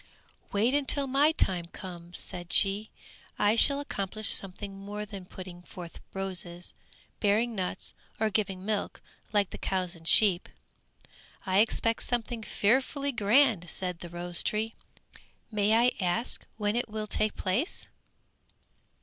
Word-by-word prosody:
"Wait, 220 +6 +2
until 285 0 +2
my 275 +3 +4
time 185 - 0
comes," 175 -1 -9
said 175 -1 -5
she, 200 +2 +3 0.5
"I 205 +1 +4
shall 280 +4 +6
accomplish 215 -5 -2
something 195 +1 -4
more 205 +1 -5
than 200 -3 -8
putting 180 -1 -9
forth 175 -2 -8
roses, 180 -2 -3 0.5
bearing 220 +3 +2
nuts, 185 -4 -1 0.3
or 220 0 +2
giving 195 -3 -1
milk, 210 -1 -2 0.3
like 205 -2 +2
the - - -7
cows 185 -2 -1
and 165 -2 -8
sheep!" 195 -3 +6 1.0
"I 190 0 +3
expect 225 +1 +2
something 240 -1 -2
fearfully 265 +7 +1
grand," 220 - +3
said 180 -1 -1
the 175 - -8
rose 175 0 -1
tree, 220 +1 0 0.8
"may 210 0 +3
I 240 +2 +5
ask 185 +7 0
when 210 0 0
it 240 -1 -1
will 215 0 -3
take 215 0 0
place?" 230 - -1
205 Hz, 135 wpm, -29 LUFS, 185-225 Hz, 1.0 s, shall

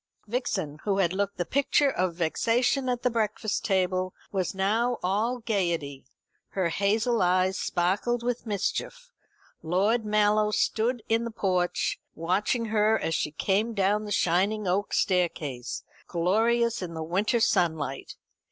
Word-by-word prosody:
Vixen, 205 - -3
who 200 -2 0
had 185 -3 +2
looked 200 +1 -2
the 175 - -1
picture 280 - +2
of 185 -6 -1
vexation 245 - +1
at 245 -1 -2
the 250 - +2
breakfast 215 -1 -1
table, 185 -1 0 0.2
was 190 -1 -2
now 225 +6 +1
all 215 +7 0
gaiety. 170 - -2 0.5
Her 185 -3 0
hazel 215 +6 +1
eyes 185 +1 +2
sparkled 205 +7 0
with 245 -1 -2
mischief. - - -3 0.5
Lord 200 +8 +1
Mallow 210 0 +2
stood 225 +2 0
in 225 +1 +2
the 235 - -3
porch, 185 -4 0 0.2
watching 195 +8 0
her 215 0 +2
as 165 - -2
she 150 - 0
came 205 +8 0
down 205 +2 +1
the 205 - -6
shining 195 +4 +1
oak 195 +3 0
staircase, 160 -9 -1 0.2
glorious 225 +7 +1
in 170 -2 -5
the 160 - -3
winter 200 +9 +1
sunlight. 160 - 0
200 Hz, 140 wpm, -27 LUFS, 180-230 Hz, 0.5 s, had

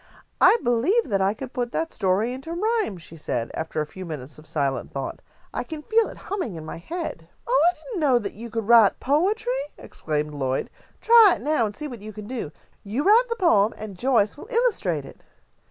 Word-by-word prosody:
"I - - +7
believe 260 - +2
that 195 -2 +1
I 195 +2 +2
could 260 +2 -8
put 245 -2 -2
that 325 0 -1
story 200 +5 0
into 270 +6 -6
rhyme," 425 - 0
she 165 -1 -13
said, 120 -7 -3
after 160 -1 -3
a - - -1
few 185 +5 -9
minutes 150 -4 -8
of 155 - -16
silent 140 -3 -2
thought. 135 -1 -5 0.3
"I - - -2
can 310 -2 -8
feel 445 +3 +3
it - - -11
humming 365 - -3
in 160 -1 -7
my 160 - -6
head." 335 - -6 0.2
"Oh, 480 -8 +3
I 355 - -3
didn't 465 -7 -4
know 275 -6 +4
that 210 -4 -3
you 230 +3 -8
could 225 -2 -3
write 230 -4 +6
poetry," 305 - +1 0.2
exclaimed 150 -1 -4
Lloyd. 135 -2 -2 0.3
"Try 455 -5 +7
it - - -10
now, 295 -7 +2
and 205 - -8
see 300 - -5
what 240 -7 -9
you 215 +1 -8
can 210 0 -8
do. 230 - -5 0.3
You 220 +8 -2
write 460 +6 +5
the 465 - -1
poem, 230 - +3
and 210 -3 -7
Joyce 225 -1 +2
will 405 - -10
illustrate 415 - 0
it." - - -13
235 Hz, 215 wpm, -24 LUFS, -, 0.3 s, I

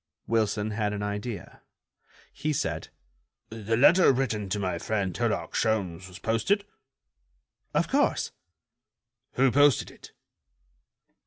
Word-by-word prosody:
Wilson 110 -1 0
had 105 -1 -1
an 105 0 -3
idea. 105 -2 -5 0.7
He 155 0 -2
said: - - -2 0.6
"The 115 0 -2
letter 170 +8 +6
written 110 -6 -1
to 105 - -1
my 90 -4 -2
friend 100 -4 -2
Herlock - - -1
Sholmes 95 -5 -1
was 90 0 -11
posted?" 115 - 0 1.1
"Of - - +2
course." - - +1 1.0
"Who 130 0 +3
posted 145 -2 +4
it?" - - -15
110 Hz, 110 wpm, -27 LUFS, 100-125 Hz, 1.1 s, letter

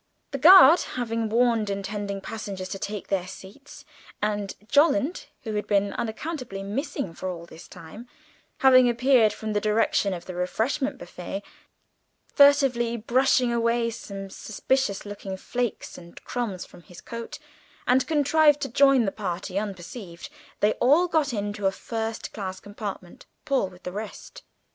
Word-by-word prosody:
The 275 - -3
guard 350 0 +9 0.2
having 230 -2 -2
warned 230 -2 +2
intending 200 0 -4
passengers 195 -3 -6
to 195 - -5
take 205 0 -5
their 185 -2 -1
seats, 205 +10 -12 0.3
and 205 -1 -2
Jolland, 295 +3 +2 0.2
who 220 -3 -4
had 210 0 -2
been 200 -1 +1
unaccountably 235 -3 -5
missing 215 - -4
all 180 -3 -4
this 165 0 -13
time, 185 +7 -11 0.5
having 255 -2 +7
appeared 240 -2 +4
from 215 -1 -5
the 205 - 0
direction 215 -1 +1
of 170 - -9
the 185 - -7
refreshment 225 +11 -1
buffet, 180 +3 -7 0.9
furtively 270 -5 +4
brushing 245 +1 +2
away 230 0 +1
some 195 -3 -8
suspicious 215 0 -1
looking 200 -2 -6
flakes 240 +3 -4
and 170 -1 -14
crumbs 225 -7 -4
from - - -16
his 175 0 -14
coat, 235 +6 -7 0.5
and 255 +1 +3
contrived 300 -1 +4
to - - -2
join 275 -1 +4
the 195 - 0
party 185 -1 -3
unperceived, 190 -2 -7 0.3
they 210 - +4
all 295 +9 +4
got 315 -5 +1
into 205 -2 -2
a - - +2
first 225 +2 -5
class 190 -3 -5
compartment 205 -3 -8 0.2
Paul 275 -8 +1
with 180 0 -18
the 180 - -5
rest. 210 +3 -8
220 Hz, 145 wpm, -25 LUFS, 195-255 Hz, 0.9 s, guard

